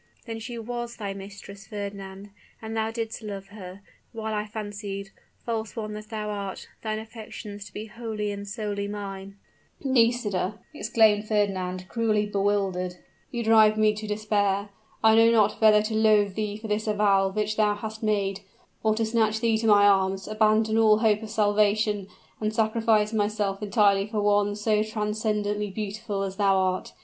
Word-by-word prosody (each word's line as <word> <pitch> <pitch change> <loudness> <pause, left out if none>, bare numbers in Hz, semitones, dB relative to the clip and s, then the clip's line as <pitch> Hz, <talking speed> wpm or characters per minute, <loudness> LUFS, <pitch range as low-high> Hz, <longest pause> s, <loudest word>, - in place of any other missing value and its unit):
"Then 225 -1 -5
she 235 +1 -6
was 240 +1 -5
thy 200 -3 -4
mistress, 195 0 -10
Fernand! 200 -1 -7 0.3
And 220 0 -6
thou 220 0 0
didst 225 0 -4
love 200 -2 -7
her, 195 -2 -10 0.3
while 220 -1 -4
I 210 0 -2
fancied, 205 -2 -6 0.3
false 225 -2 -3
one 215 -2 -4
that 210 0 -8
thou 215 -1 -4
art, 200 -2 -5
thine 215 -1 -2
affections 215 -2 -8
to 205 - -12
be 210 +3 -6
wholly 220 -2 -4
and 200 0 -6
solely 205 -1 -3
mine." 200 -1 -7 0.5
"Nisida," 230 -6 +1 0.2
exclaimed 215 -4 +3
Fernand, 185 -3 -1
cruelly 215 -1 +1
bewildered, 195 -3 0 0.3
"you 240 -2 -3
drive 220 -1 +5
me 215 0 +4
to 215 0 -6
despair. 205 -1 0 0.3
I 220 0 +7
know 225 +1 +6
not 215 -2 +3
whether 215 -1 +6
to 215 +1 -3
loathe 215 -2 +4
thee 210 0 -3
for 220 +1 -8
this 210 +1 -1
avowal 200 -2 +3
which 215 +1 -1
thou 210 -1 +2
hast 220 +1 -7
made, 200 -3 0 0.4
or 215 -1 +2
to 225 0 0
snatch 220 -1 +1
thee 230 -1 +2
to 225 - 0
my 205 -1 +6
arms, 195 -1 +2
abandon 215 +1 +2
all 215 -1 +6
hope 215 -1 +2
of 220 - -7
salvation, 210 -1 +2 0.3
and 215 0 -1
sacrifice 220 -1 +2
myself 205 -2 0
entirely 200 -2 +3
for 215 -1 -2
one 205 0 +2
so 210 0 +1
transcendently 210 -1 -1
beautiful 205 0 -4
as 195 -1 -5
thou 195 -2 +3
art. 185 -1 -1
210 Hz, 165 wpm, -26 LUFS, 200-220 Hz, 0.5 s, I